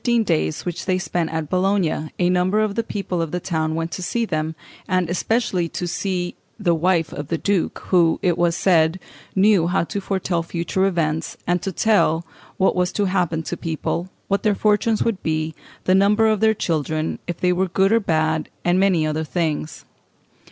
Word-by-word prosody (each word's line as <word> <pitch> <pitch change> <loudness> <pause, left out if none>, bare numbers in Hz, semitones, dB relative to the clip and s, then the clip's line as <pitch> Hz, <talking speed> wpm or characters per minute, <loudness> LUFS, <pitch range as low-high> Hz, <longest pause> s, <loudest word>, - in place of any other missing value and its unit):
During 235 -2 +3
the - - +1
fifteen - - +2
days 80 0 -2
which 175 -2 -4
they 185 -1 +2
spent 175 -3 -2
at 160 -1 -3
Bologna 185 -3 0
a 175 -1 +2
number 185 +3 +2
of 215 -2 +1
the 230 - 0
people 195 -5 -3
of 165 - -2
the 180 - -2
town 160 -3 -1
went 165 +1 -2
to 185 - -5
see 230 +6 -1
them, 160 -4 -2 0.3
and 185 -2 +1
especially 180 -1 0
to 175 - -4
see 175 0 -2 0.2
"the 180 -5 +2
wife 165 0 +1
of 145 - -5
the 165 - -1
duke," 200 0 0
who, 170 -3 +4
it 175 -2 +3
was 170 -1 +1
said, 170 -1 +3 0.4
knew 195 -3 +4
how 180 +1 +1
to 200 +4 -4
foretell 190 -3 -1
future 170 +3 -1
events, 160 -4 -1
and 175 0 +1
to 195 - -3
tell 170 -5 +2 0.3
what 190 - +2
was 180 -1 +1
to 205 - +1
happen 175 -4 0
to 175 - -4
people, 170 +2 -3 0.2
what 200 0 +1
their 210 -2 +2
fortunes 215 +2 +2
would 220 -5 -1
be, 155 0 -1 0.3
the 185 - +3
number 205 +3 +4
of 215 -2 +3
their 220 +1 +3
children, 155 -3 -1
if 175 -1 -4
they 180 0 +2
were 190 +1 +1
good 190 +3 +2
or 230 - +5
bad, 160 -4 0 0.2
and 175 +1 +3
many 185 -5 +3
other 155 +1 -1
things 155 -1 -2
(Fig. - - -30
180 Hz, 205 wpm, -22 LUFS, 160-195 Hz, 0.4 s, or